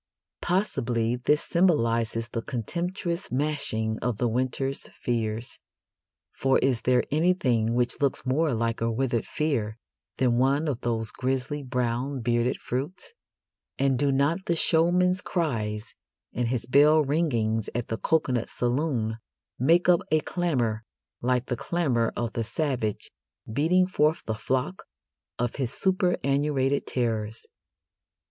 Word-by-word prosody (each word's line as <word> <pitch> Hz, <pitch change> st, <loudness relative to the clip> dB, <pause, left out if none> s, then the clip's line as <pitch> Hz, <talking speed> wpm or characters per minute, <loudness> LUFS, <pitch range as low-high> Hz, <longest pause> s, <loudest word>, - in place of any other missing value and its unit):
Possibly 125 Hz, -, 0 dB
this 150 Hz, +4 st, +1 dB
symbolises 115 Hz, -10 st, +1 dB
the 115 Hz, -, -3 dB
contemptuous 170 Hz, -, -3 dB
smashing 125 Hz, -6 st, -1 dB
of 120 Hz, -3 st, -1 dB
the 120 Hz, -, +1 dB
winter's 130 Hz, +3 st, -1 dB
fears, 115 Hz, -1 st, -3 dB, 0.7 s
for 135 Hz, 0 st, +2 dB
is 130 Hz, -3 st, +1 dB
there 125 Hz, 0 st, +3 dB
anything 140 Hz, -9 st, +2 dB
which 120 Hz, +2 st, 0 dB
looks 140 Hz, -2 st, 0 dB
more 140 Hz, +1 st, +1 dB
like 115 Hz, 0 st, -1 dB
a 115 Hz, 0 st, +1 dB
withered 120 Hz, -1 st, -1 dB
fear 120 Hz, -9 st, -1 dB, 0.4 s
than 125 Hz, -2 st, +2 dB
one 140 Hz, +4 st, +2 dB
of 135 Hz, -4 st, -2 dB
those 115 Hz, -2 st, -1 dB
grisly 130 Hz, +3 st, -2 dB
brown 125 Hz, +1 st, -2 dB
bearded 120 Hz, +2 st, +1 dB
fruits? 145 Hz, -, -4 dB, 0.6 s
And 135 Hz, -2 st, +2 dB
do 140 Hz, 0 st, +2 dB
not 145 Hz, +8 st, +1 dB
the 170 Hz, -, +1 dB
showman's 180 Hz, +4 st, +3 dB
cries 115 Hz, -, -2 dB, 0.4 s
and 120 Hz, 0 st, 0 dB
his 120 Hz, -1 st, -1 dB
bell 150 Hz, +4 st, +5 dB
ringings 115 Hz, -8 st, 0 dB
at 120 Hz, -1 st, -2 dB
the 115 Hz, -, -1 dB
coconut 130 Hz, -7 st, +1 dB
saloon 120 Hz, -3 st, -1 dB, 0.4 s
make 165 Hz, +8 st, +4 dB
up 175 Hz, -2 st, +6 dB
a 155 Hz, 0 st, +3 dB
clamour 125 Hz, -, -1 dB, 0.4 s
like 125 Hz, 0 st, +1 dB
the 125 Hz, -, -2 dB
clamour 125 Hz, -5 st, 0 dB
of 120 Hz, -1 st, -2 dB
the 115 Hz, -, -1 dB
savage 120 Hz, -3 st, -2 dB, 0.3 s
beating 160 Hz, +11 st, +2 dB
forth 155 Hz, -3 st, +1 dB
the 110 Hz, -, -1 dB
flock 130 Hz, -, -2 dB, 0.5 s
of 120 Hz, 0 st, -2 dB
his 130 Hz, -4 st, -1 dB
superannuated 145 Hz, -7 st, +1 dB
terrors? 110 Hz, -3 st, -2 dB
130 Hz, 130 wpm, -26 LUFS, 115-155 Hz, 0.7 s, up